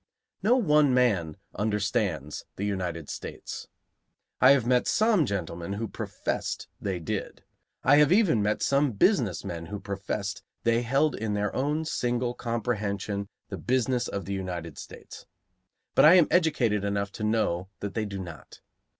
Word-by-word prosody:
No 240 +4 +4
one 150 - +4
man 95 -11 +2 0.2
understands 100 - -1
the 100 - -3
United 90 -6 -3
States. - - -7 0.7
I 130 - +8
have 135 -4 +5
met 125 0 +2
some 215 - +3
gentlemen 85 -2 -3
who 110 +3 -3
professed - - -4
they 95 -3 -2
did. 80 - -5 0.4
I 145 +3 +6
have 150 +1 +5
even 185 - +4
met 105 +1 0
some 140 -2 +2
business 110 - +2
men 85 -1 -5
who 105 0 -5
professed 100 0 -4 0.2
they 115 0 +3
held 135 +5 +2
in 105 -2 -2
their 105 0 -1
own 150 +4 0
single 120 -4 -1
comprehension 105 -4 -2 0.2
the - - -5
business 125 -1 0
of 100 - -4
the 100 - -3
United 90 -4 -5
States; - - -11 0.7
but - - +5
I 160 +4 +9
am 175 -4 +6
educated 135 - +2
enough 100 0 -1
to 110 - -7
know 105 -5 0
that 100 -1 -4
they 110 -1 -1
do 100 -1 -5
not. 85 -4 -9
105 Hz, 155 wpm, -27 LUFS, 100-130 Hz, 0.7 s, I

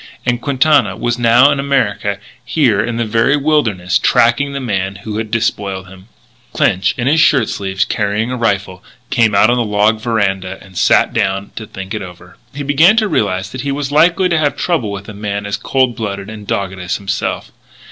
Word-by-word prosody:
And 120 -1 0
Quintana 140 +2 +2
was 120 0 -2
now 120 +4 +5
in 140 - -1
America, 105 -8 0 0.3
here 125 -7 +1
in 115 0 -3
this 120 -1 -1
very 115 +6 +2
wilderness, 110 - +1
tracking 130 +5 +2
the 140 - -4
man 100 -6 -2
who 105 +1 -6
had 110 -1 -3
despoiled 100 -4 -2
him. 95 +1 -15 0.5
Clinch, 95 +2 +1
in 120 - -2
his 150 +5 +3
shirt 135 -7 +3
sleeves, 95 -1 -2
carrying 105 +3 -1
a - - -2
rifle, 100 -5 -2 0.3
came 115 -4 +2
out 110 +4 +5
on 125 - +1
the 120 - +1
log 105 +1 +1
veranda 95 -5 -1
and 95 -1 -17
sat - - +3
down 95 +1 -1
to 110 - -7
think 95 +1 -8
it 110 - -3
over. 90 -1 -12
He 145 +1 -6
began 155 +9 +4
to 220 -2 +3
realise 95 - -1
that 130 +3 -6
he 140 - -2
was 140 0 -3
likely 170 +5 +3
to 170 -2 +1
have 145 -2 0
trouble 160 - -1
with 100 0 -7
a 105 - -8
man 100 0 -4
as 100 +1 -2
cold 130 -1 0
blooded 100 -3 -5
and 105 -1 -9
as - - -24
dogged 95 -1 -3
as 90 0 -3
himself. 100 0 -3
110 Hz, 205 wpm, -16 LUFS, 100-135 Hz, 0.5 s, now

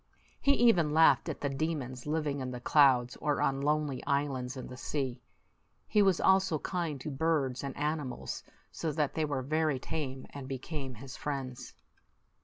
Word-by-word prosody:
He 280 - +4
even 180 - +4
laughed 165 +1 +5
at 155 - -5
the 140 - 0
demons 135 -3 -3
living 150 -2 -1
in 130 -1 -3
the 125 -1 -5
clouds 125 -2 +4
or 150 -1 0
on 135 0 +1
lonely 150 -2 0
islands 140 -2 -1
in 130 - -6
the 130 - -8
sea. 130 -2 -3 0.7
He 210 - +4
was 195 -3 +4
also 190 -4 +4
kind 165 -3 -3
to 155 - -4
birds 140 -3 0
and 140 -1 -5
animals, 150 -3 -3 0.3
so 160 - -2
that 150 -2 0
they 160 - 0
were 140 -3 -2
very 155 0 +1
tame, 135 -2 -4
and 140 -2 -7
became 135 0 -5
his 130 +4 -9
friends. 135 -4 -5
145 Hz, 170 wpm, -31 LUFS, 130-155 Hz, 0.7 s, laughed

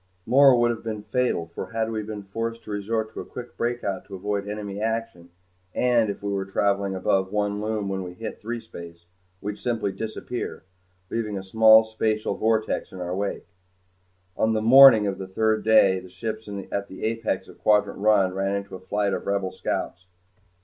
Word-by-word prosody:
More 135 -1 +6
would 120 0 +3
have 115 - -6
been 110 -2 -4
fatal 110 -5 0
for 85 0 -7
had 115 0 -1
we 110 -1 -2
been 105 -1 -7
forced 115 +4 -4
to - - -9
resort 110 +2 -2
to - - -7
a - - -6
quick 125 -1 -9
breakout 120 -5 -2
to 100 - -9
avoid 100 +1 -3
enemy 105 -1 -5
action, 110 -6 -3 0.5
and 120 -3 +3
if 100 - -5
we 100 - -2
were 100 -1 -1
travelling 100 0 0
above 95 0 0
one 105 0 -1
Lume 105 -1 -2
when 95 0 -2
we 90 -1 -7
hit 110 +3 -7
threespace, 85 -7 -8 0.4
we'd 105 +1 -5
simply 110 -5 -1
disappear, 110 +4 -5 0.5
leaving 105 -3 -2
a 95 - -5
small 110 +3 +7
spatial 110 -1 -1
vortex 110 0 0
in 95 - -9
our 90 0 -3
wake. 100 +1 -3 0.9
On 110 0 +1
the 110 - 0
"morning" 125 -2 +9
of 100 -1 -2
the 95 - -5
third 110 +3 0
day 100 -4 +5
the 90 0 -13
ships 110 +4 -6 0.2
at 100 0 -2
the 95 - -10
apex 115 0 -1
of - - -15
Quadrant 105 -2 +2
One 100 -3 +3
ran 95 +1 -1
into 100 0 -5
a 95 - -6
flight 100 +2 -1
of - - -4
Rebel 100 -2 0
scouts. 90 +1 -4
105 Hz, 190 wpm, -25 LUFS, 95-110 Hz, 0.9 s, morning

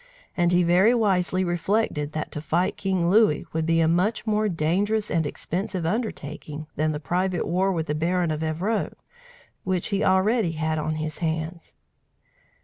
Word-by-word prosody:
And 175 -1 +2
he 180 0 +4
very 185 +8 +4
wisely 190 -4 +1
reflected 175 -3 -1
that 155 - -4
to 150 - -4
fight 170 +5 0
King 185 -3 0
Louis 210 -7 +4
would 160 0 -1
be 165 0 +3
a 160 - +3
much 185 +8 +1
more 215 -1 +1
dangerous 200 +6 0
and 160 -3 +1
expensive 180 +2 -3
undertaking 155 - -4
than 155 +1 +1
the 150 - -3
private 180 +3 -1
war 185 +3 +1
with 165 -4 -1
the 150 - -2
Baron 170 +2 0
of 155 0 -3
Evreux, 170 +8 -1 0.7
which 185 -2 -1
he 200 -1 0
already 190 0 +2
had 155 0 -1
on 155 +1 -2
his 155 0 -4
hands. 160 0 -3
175 Hz, 165 wpm, -25 LUFS, 160-195 Hz, 0.7 s, he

